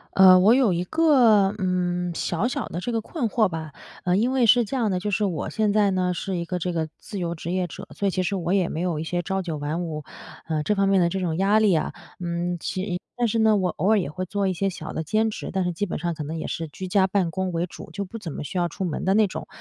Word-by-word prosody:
呃， 190 -1 +9
我 205 +5 +6
有 250 -7 +4
一 175 +1 -1
个， 230 - +4
嗯， 180 -2 -1
小 175 +6 -1
小 245 - -3
的 175 - -5
这 240 - -3
个 225 -1 0
困 255 +1 -2
惑 220 -1 +3
吧。 160 -3 -6 0.3
呃， 180 0 +2
因 230 +6 +2
为 260 -2 +3
是 240 +2 +6
这 230 +5 -3
样 225 -5 +1
的， 185 - 0
就 210 +3 -3
是 205 +1 +1
我 175 -6 -2
现 215 -2 +1
在 210 -1 +4
呢， 185 -1 +1
是 185 +1 -3
一 170 - -3
个 180 +1 -3
这 180 +1 -2
个 165 -2 -1
自 205 - -8
由 170 -2 -2
职 170 +1 -5
业 185 0 0
者， 190 +3 -9
所 200 - 0
以 195 - +1
其 185 - 0
实 195 +2 -1
我 175 0 -1
也 185 -4 +2
没 155 - -4
有 175 -4 -1
一 155 - -2
些 175 +2 -2
朝 190 +2 -1
9 165 -4 -4
晚 150 +4 -2
5， 155 -3 -5 0.4
呃， 155 -2 -1
这 210 +7 0
方 195 0 +2
面 195 -1 +4
的 170 - +3
这 190 +2 -2
种 165 -3 -1
压 195 +3 +3
力 215 -3 +4
啊。 155 - 0 0.3
嗯， 175 0 -2
其 185 +3 -3
实 205 - -4
一 180 +1 -2
但 240 -1 +1
是 225 - 0
呢， 220 -1 +5
我 185 -2 +1
偶 190 - -1
尔 220 -1 +5
也 175 - -2
会 185 +4 -4
做 200 +1 -1
一 190 - +1
些 195 +2 0
小 160 -3 -7
的 160 - -2
兼 215 +7 +1
职， - - -6
但 190 -1 +1
是 180 - 0
基 175 +4 -2
本 180 - -4
上 170 +1 -2
可 155 - -5
能 155 +3 -5
也 160 - -4
是 165 - -4
居 185 +5 -7
家 190 +1 +3
办 190 -2 +1
公 190 +1 -2
为 170 0 -1
主， - - -11
就 200 - -3
不 210 +5 -8
怎 180 -7 -6
么 - - -5
需 165 - -5
要 175 -1 +2
出 170 - -5
门 170 -5 -3
的 190 - +3
那 215 0 +4
种。 - - -7
185 Hz, 320 characters per minute, -24 LUFS, 170-205 Hz, 0.4 s, 呃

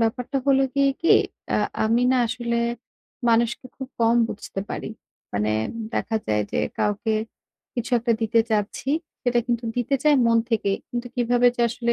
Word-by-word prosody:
ব্যাপারটা 245 +4 -1
হলো 270 -1 +5
গিয়ে 275 0 +4
কি, 335 - +3 0.4
আ - - +3 0.3
আমি 230 +3 +2
না - - +3
আসলে 235 0 -2 0.7
মানুষকে 235 +2 +2
খুব 265 -1 -6
কম 230 +1 +4
বুঝতে 195 - -6
পারি। - - -4 0.5
মানে 105 +1 +1 0.4
দেখা 225 - -1
যায় 105 -1 +1
যে - - 0 0.2
কাউকে 210 +2 0 0.6
কিছু 240 +1 -3
একটা 235 0 +1
দিতে 225 +1 +3
চাচ্ছি, 215 +5 -1 0.3
সেটা 245 -2 +2
কিন্তু 240 -1 -1
দিতে 245 +3 0
চাই 300 -1 +6
মন 230 0 +4
থেকে। 215 -3 +1 0.2
কিন্তু 240 0 -3
কিভাবে 245 0 +3
যে 240 - +1
আসলে 235 0 0
235 Hz, 160 wpm, -24 LUFS, 225-245 Hz, 0.7 s, চাই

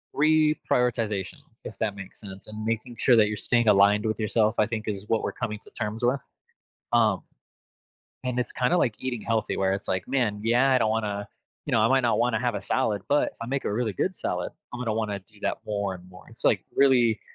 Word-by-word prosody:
reprioritization, 125 - +1 0.3
if - - -8
that 105 -2 -1
makes 95 -1 -10
sense, 95 -2 -10
and 110 0 -7
making 115 +2 -2
sure 125 - +5
that 110 -2 +5
you're 105 0 -3
staying 120 -2 +1
aligned 105 +1 +5
with 110 0 -2
yourself, 110 0 +2
I 105 - +5
think, 110 -2 -4
is 105 -1 -3
what 115 - +1
we're - - -1
coming 105 -1 -4
to - - -15
terms 105 +2 -3
with, 125 +3 +2 0.7
um, 110 -5 +3 1.0
and 125 -1 -2
it's - - -3
kinda, 130 +8 +1
like, 120 -10 +2
eating 125 -4 -4
healthy 110 -2 -1
where 95 0 +1
it's, 100 - -6
like, 95 +3 -2
"Man, 115 -6 0
yeah, 125 +4 +4
I 130 - +5
don't 110 -2 +1
wanna 105 -2 -2 0.4
you - - -3
know, 110 - +4
I 110 - +4
might 135 +1 +4
not 120 -2 +1
wanna 120 -1 +2
have 120 -3 0
a 100 - -2
salad, 105 -3 0
but 145 +1 +3
if - - -29
I - - -4
make 135 +2 -2
a - - -1
really 110 -1 -1
good - - -1
salad, - - -3 0.2
I'm 125 - -5
gonna 115 -3 -1
wanna 105 -2 -2
do 105 +2 -23
that - - -1
more 100 -2 -2
and 90 0 -12
more." 90 - -15
It's, - - -12
like, - - +3
really 125 -5 +4
110 Hz, 230 wpm, -26 LUFS, 105-125 Hz, 1.0 s, sure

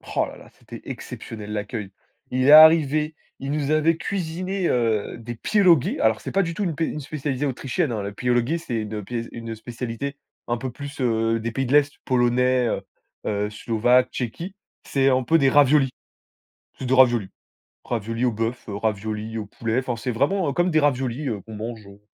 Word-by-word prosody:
Oh - - +3
là - - -10
là! - - -15
C'était - - -12
exceptionnel 105 -2 -7
l'accueil. 105 0 -4 0.4
Il 130 0 0
est - - +7
arrivé, 155 -1 +7 0.2
il 135 +1 -4
nous 145 -1 -1
avait 155 +1 +3
cuisiné, 185 +1 -2
heu, 115 -4 0
des 120 +1 -7
pierogis. 175 - +3
Alors 110 -1 +2
c'est - - -5
pas 195 - +2
du 170 -2 -3
tout 205 - -3
une 170 -5 -1
pé 165 +3 0
une 150 - -4
spécialité 145 -1 -3
autrichienne 135 +3 -1
hein. 105 -3 -2
Les 100 - -4
pierogis, 125 +8 0
c'est 125 -7 -5
une 105 -1 -5
pé 115 +2 -4
une 115 -1 -6
spécialité, 120 +4 -5 0.3
un 120 - 0
peu 130 +2 -5
plus, 140 +3 -9
heu, 115 -1 +1
des 115 +1 -3
pays 135 +3 -1
de 130 - -2
l'est 145 -1 +5
Polonais, 125 0 +2
heu, - - -1 0.4
heu, 105 0 -1
Slovaque, 120 +4 +2
Tchéquie. 165 - -5 0.3
C'est 135 -1 +2
un 130 0 +2
peu 160 +7 +4
des 135 -4 +4
raviolis, 140 0 +5 0.9
c'est 130 - -5
des 130 - +2
raviolis! 120 -6 +4 0.5
Raviolis 115 +1 -2
au 125 - +2
bœuf, 115 +3 -3
heu, 100 - -4
raviolis 110 +1 -3
au 105 - -5
poulet, 115 +3 -1
enfin 125 -2 -3
c'est 125 +2 -3
vraiment, 145 - +1
heu, - - -2
comme 175 +5 +2
des 155 - +4
raviolis, 135 -1 0
heu, 105 -4 -3
qu'on 110 +3 -10
mange, 110 0 -6
heu, 100 0 -14
125 Hz, 200 wpm, -23 LUFS, 115-145 Hz, 0.9 s, est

